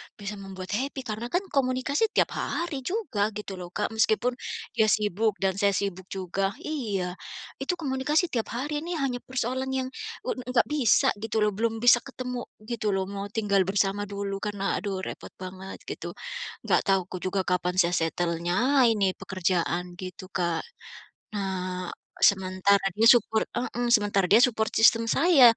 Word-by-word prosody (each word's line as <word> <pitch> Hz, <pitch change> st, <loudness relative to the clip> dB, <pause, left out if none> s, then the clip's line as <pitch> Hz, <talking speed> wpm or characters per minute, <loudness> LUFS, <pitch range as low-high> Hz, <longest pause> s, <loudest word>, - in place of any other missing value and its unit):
bisa 205 Hz, 0 st, -6 dB
membuat 190 Hz, -1 st, -8 dB
happy 265 Hz, +4 st, -2 dB
karena 220 Hz, +1 st, -4 dB
kan 355 Hz, +8 st, 0 dB
komunikasi 275 Hz, -, +1 dB
tiap -, -, +3 dB
hari 340 Hz, -5 st, -2 dB
juga 265 Hz, -, -1 dB
gitu 200 Hz, -3 st, -6 dB
loh, 175 Hz, -, -6 dB
Kak. 210 Hz, +5 st, -2 dB
Meskipun, 225 Hz, +3 st, +1 dB, 0.3 s
dia 220 Hz, -2 st, +3 dB
sibuk 210 Hz, 0 st, +2 dB
dan 190 Hz, 0 st, +1 dB
saya 200 Hz, -1 st, +3 dB
sibuk 190 Hz, -2 st, -3 dB
juga, 195 Hz, +2 st, -2 dB
iya, 200 Hz, -12 st, -3 dB, 0.4 s
itu 285 Hz, +7 st, -1 dB
komunikasi 300 Hz, +3 st, 0 dB
tiap 230 Hz, -3 st, -1 dB
hari 295 Hz, +4 st, -2 dB
ini 340 Hz, +2 st, -4 dB
hanya 265 Hz, -5 st, -1 dB
persoalan 260 Hz, +1 st, -1 dB
yang 260 Hz, -1 st, -1 dB, 0.4 s
u -, -, -1 dB
nggak 250 Hz, -1 st, +1 dB
bisa 270 Hz, -8 st, +4 dB
gitu 220 Hz, 0 st, 0 dB
loh, 210 Hz, -, +3 dB
belum 225 Hz, +2 st, -1 dB
bisa 240 Hz, 0 st, +7 dB
ketemu 250 Hz, -1 st, -6 dB, 0.2 s
gitu 215 Hz, -3 st, -1 dB
loh, 190 Hz, -, +1 dB
mau 200 Hz, 0 st, -4 dB
tinggal 200 Hz, -3 st, +1 dB
bersama 200 Hz, +1 st, +1 dB
dulu, 200 Hz, -1 st, -4 dB
karena 205 Hz, -1 st, -4 dB, 0.2 s
aduh 195 Hz, -2 st, -3 dB
repot -, -, -7 dB
banget 185 Hz, +1 st, -7 dB
gitu. -, -, -5 dB, 0.5 s
Nggak -, -, +3 dB
tahu 195 Hz, -1 st, +4 dB
ku 185 Hz, -, -5 dB
juga 190 Hz, +1 st, +1 dB
kapan 180 Hz, 0 st, +1 dB
saya 175 Hz, -1 st, +4 dB
settle-nya 175 Hz, -, +2 dB
ini 200 Hz, -3 st, +2 dB
pekerjaan 180 Hz, -1 st, -1 dB
gitu, 185 Hz, 0 st, -8 dB
Kak. 170 Hz, -3 st, 0 dB, 0.7 s
Nah, 185 Hz, -3 st, -3 dB, 0.3 s
sementara 190 Hz, 0 st, +4 dB
dia 225 Hz, +1 st, +4 dB
support 225 Hz, -3 st, +5 dB
heeh, 245 Hz, 0 st, -1 dB
sementara 205 Hz, -3 st, +3 dB
dia 220 Hz, +3 st, +7 dB
support 220 Hz, -3 st, +1 dB
system 230 Hz, +1 st, +6 dB
saya 260 Hz, -7 st, +6 dB
210 Hz, 160 wpm, -27 LUFS, 190-250 Hz, 0.7 s, bisa